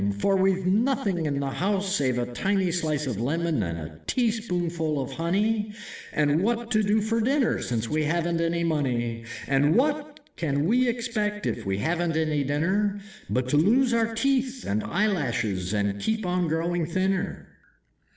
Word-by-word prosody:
For 195 - +2
we've 190 -1 +2
nothing 200 - +1
in 140 -1 -1
the 140 -1 -2
house, 195 +3 0
Save 130 -6 +1
a 120 - 0
tiny 190 +4 +1
slice 155 -4 -1
of 115 -5 -3
lemon 160 +2 0
and 85 -3 -2
a 80 0 -8
teaspoonful 175 - 0
of 135 0 -4
honey, 210 +7 0 0.4
And 150 +1 +2
what 235 +3 -1
to 215 -2 +3
do 210 +1 +2
for 225 +2 0
dinner 265 +2 +1
since 115 -2 -2
we 155 +3 0
haven't 170 +1 0
any 170 0 0
money? 120 -8 -1 0.2
And 145 +4 +3
what 295 +2 0 0.2
can 145 -3 0
we 245 +7 +3
expect 220 -4 -2
if - - -2
we 95 0 0
haven't 165 - 0
any 155 -2 +1
dinner, 190 +9 0 0.3
But 125 0 0
to 145 - +3
lose 240 - +4
our 225 -1 +1
teeth 265 0 0
and 105 +2 0
eyelashes 115 - 0
and 100 -1 -1
keep 220 -2 -1
on 180 -1 0
growing 165 +1 0
thinner?" 190 +2 -1
175 Hz, 165 wpm, -26 LUFS, 145-215 Hz, 0.4 s, lose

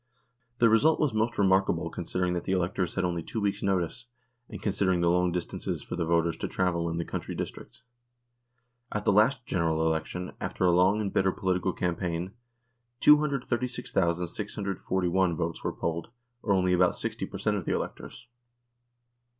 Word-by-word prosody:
The 120 - +5
result 130 +9 +4
was 150 -6 +1
most 110 +2 0
remarkable 95 -1 +2
considering 90 -1 -2
that 85 - -3
the 95 - 0
electors 90 0 -1
had 95 - +1
only 85 -1 -1
two 110 - -4
weeks' 100 -1 -1
notice, 95 +5 -1 0.4
and 105 - -7
consider 100 -2 +1
ing 90 -1 +1
the 85 0 +3
long 90 0 +2
distances 90 -1 -3
for - - -5
the 85 -2 -1
voters 85 0 +2
to - - -3
travel 85 -3 0
in 85 - -3
the 85 - -2
country - - -5
districts. - - -7 1.1
At 105 0 -3
the - - +4
last 120 +5 +3
General 80 -5 0
Election, 80 +3 -2
after 95 - -1
a 90 - +5
long 95 +4 +4
and 100 -2 -3
bitter 95 0 +3
political 95 -1 0
campaign, 90 0 -2 0.7
236,641 95 - +1
votes 85 -1 -3
were - - 0
polled, 85 +3 -3 0.3
or 105 - -1
only 90 -1 +2
about 90 0 +3
60 - - -3
per - - -7
cent, - - 0
of - - -5
the - - 0
electors. - - -6
90 Hz, 165 wpm, -28 LUFS, 85-105 Hz, 1.1 s, The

